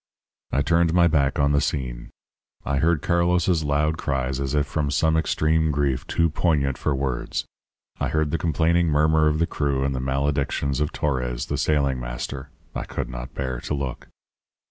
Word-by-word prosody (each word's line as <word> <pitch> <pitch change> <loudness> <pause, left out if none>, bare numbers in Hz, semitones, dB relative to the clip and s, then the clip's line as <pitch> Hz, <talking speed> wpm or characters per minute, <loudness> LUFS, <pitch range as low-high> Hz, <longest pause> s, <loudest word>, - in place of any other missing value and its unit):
"I 70 +2 +1
turned 85 +2 +2
my 85 -1 +6
back 70 -5 +2
on 70 0 +3
the 70 0 +3
scene. - - -3 0.6
I 70 - 0
heard 80 0 +2
Carlos's 85 -1 +2
loud 75 +2 0
cries 65 -1 -1
as 70 +1 -2
if 75 0 +2
from 75 0 -2
some 80 +2 +2
extreme 80 0 +2
grief 70 -3 0
too 85 - +2
poignant 75 -5 +1
for 75 - -1
words. 65 -2 -2 0.5
I - - 0
heard 75 -1 0
the 85 - 0
complaining 85 +2 +2
murmur 75 +1 +3
of 75 0 +2
the 85 - +2
crew 70 -4 -1
and 70 0 0
the 65 - -3
maledictions 70 +1 -1
of 75 - 0
Torres, 65 -4 -2
the - - -3
sailing 70 -4 +1
master 60 +3 -5 0.2
I - - -4
could - - -4
not 60 0 -7
bear 65 -2 -3
to 75 - -2
look. 70 -3 -5
70 Hz, 180 wpm, -24 LUFS, 65-80 Hz, 0.6 s, my